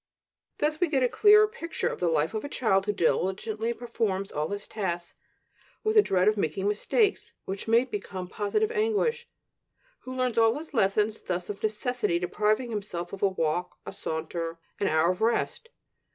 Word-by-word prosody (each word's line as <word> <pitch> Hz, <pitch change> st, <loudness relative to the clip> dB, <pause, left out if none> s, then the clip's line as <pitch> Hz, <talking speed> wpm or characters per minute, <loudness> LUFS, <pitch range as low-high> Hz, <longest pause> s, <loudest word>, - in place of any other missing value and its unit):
Thus 305 Hz, +1 st, 0 dB
we 355 Hz, -, +3 dB
get 275 Hz, -5 st, +1 dB
a -, -, +5 dB
clearer 425 Hz, -, +6 dB
picture 380 Hz, -7 st, -4 dB
of -, -, -3 dB
the 180 Hz, -, +1 dB
life 160 Hz, +1 st, +1 dB
of 215 Hz, -, -3 dB
a 285 Hz, -, -5 dB
child 195 Hz, -8 st, +1 dB
who -, -, +3 dB
diligently 205 Hz, +4 st, 0 dB
performs 225 Hz, -5 st, -2 dB
all 150 Hz, +1 st, -2 dB
his 205 Hz, 0 st, -4 dB
tasks 175 Hz, -5 st, -3 dB, 0.7 s
with 435 Hz, 0 st, +1 dB
a 425 Hz, -, +9 dB
dread 185 Hz, -, +2 dB
of 215 Hz, 0 st, +3 dB
making 190 Hz, +2 st, -1 dB
mistakes 395 Hz, -, +1 dB
which 195 Hz, +3 st, -5 dB
may 230 Hz, +3 st, +4 dB
become 200 Hz, -5 st, -5 dB
positive 215 Hz, -, 0 dB
anguish; 460 Hz, +2 st, 0 dB, 0.7 s
who 255 Hz, 0 st, -8 dB
learns 250 Hz, -2 st, +1 dB
all 225 Hz, +1 st, +4 dB
his 310 Hz, 0 st, -9 dB
lessons, 210 Hz, -1 st, +2 dB
thus 180 Hz, +1 st, -3 dB
of 200 Hz, -, -10 dB
necessity 215 Hz, -3 st, 0 dB
depriving 215 Hz, +7 st, 0 dB
himself 195 Hz, -5 st, -4 dB
of 195 Hz, -, -7 dB
a 200 Hz, -, +5 dB
walk, 175 Hz, -1 st, -1 dB
a -, -, -6 dB
saunter, 165 Hz, +1 st, -4 dB, 0.2 s
an 200 Hz, -, +1 dB
hour 160 Hz, +3 st, +3 dB
of 185 Hz, -, -6 dB
rest. 235 Hz, -, 0 dB
210 Hz, 180 wpm, -27 LUFS, 185-255 Hz, 0.7 s, a